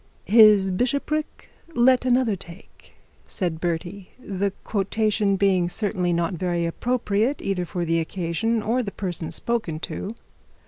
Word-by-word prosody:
'His 210 -3 +6
bishopric 280 +9 -2 0.2
let 250 +1 +4
another 250 -4 +2
take,' 175 0 -14 0.3
said 170 -4 -3
Bertie; 175 +3 -3
the 200 -5 -2
quotation 210 0 0
being 185 -3 +2
certainly 185 -1 -1
not 170 +1 0
very 175 -1 -1
appropriate, 230 - 0
either 190 -2 -2
for 175 -1 -3
the 165 0 +1
occasion, 185 +7 -1
or 235 +4 +1
the 205 -5 -4
person 175 -5 -4
spoken 220 -10 -2
to. 210 +5 -5
195 Hz, 130 wpm, -24 LUFS, 175-225 Hz, 0.3 s, His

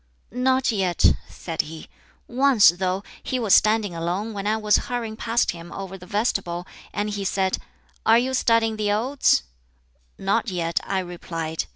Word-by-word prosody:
"Not 260 +2 +2
yet," 190 -5 +3 0.2
said 165 -2 -3
he. 160 +1 -10 0.4
"Once, 255 - +5
though, 185 +2 -1 0.2
he 260 - -2
was 225 -6 +2
standing 215 -3 +4
alone 180 +7 -3
when 200 0 -4
I 215 +1 +2
was 210 -1 +3
hurrying 235 -3 -3
past 230 +1 +1
him 170 0 -10
over 195 -1 -6
the 180 -1 -12
vestibule, 195 -5 -1 0.3
and 210 0 -2
he 205 -1 -3
said, 190 0 0 0.4
'Are 225 +1 +6
you 255 +2 0
studying 230 -3 +2
the 210 -1 0
Odes?' 240 - +2 0.7
'Not 205 +4 0
yet,' 170 -2 -1
I 195 - -1
replied. 165 -3 -4
205 Hz, 160 wpm, -24 LUFS, 180-225 Hz, 0.7 s, Are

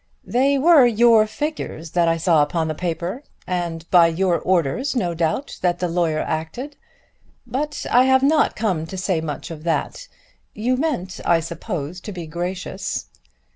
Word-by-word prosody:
"They 275 +3 +2
were 290 -3 +6
your 230 -1 +5
figures 215 - -5
that 170 -1 +2
I 165 0 +2
saw 165 -2 +3
upon 160 +2 0
the 155 - -2
paper, 175 - -3 0.2
and 170 -2 -3
by 175 -2 +7
your 175 +1 +1
orders, 185 - 0
no 180 -8 0
doubt, 165 - -2
that 175 -1 +1
the 180 - -1
lawyer 165 -2 0
acted. 200 - -4 0.7
But 285 +5 -3
I 250 +2 +5
have 265 0 +4
not 300 +2 +3
come 185 -8 -1
to 190 - -7
say 185 -3 0
much 155 +1 -5
of 155 -2 -8
that. 335 - -2 0.5
You 240 +4 0
meant 250 - -2
I 170 -1 +3
suppose 170 0 -5
to 210 - -7
be 175 -4 -6
gracious." 175 +3 -4
180 Hz, 165 wpm, -21 LUFS, 165-245 Hz, 0.7 s, by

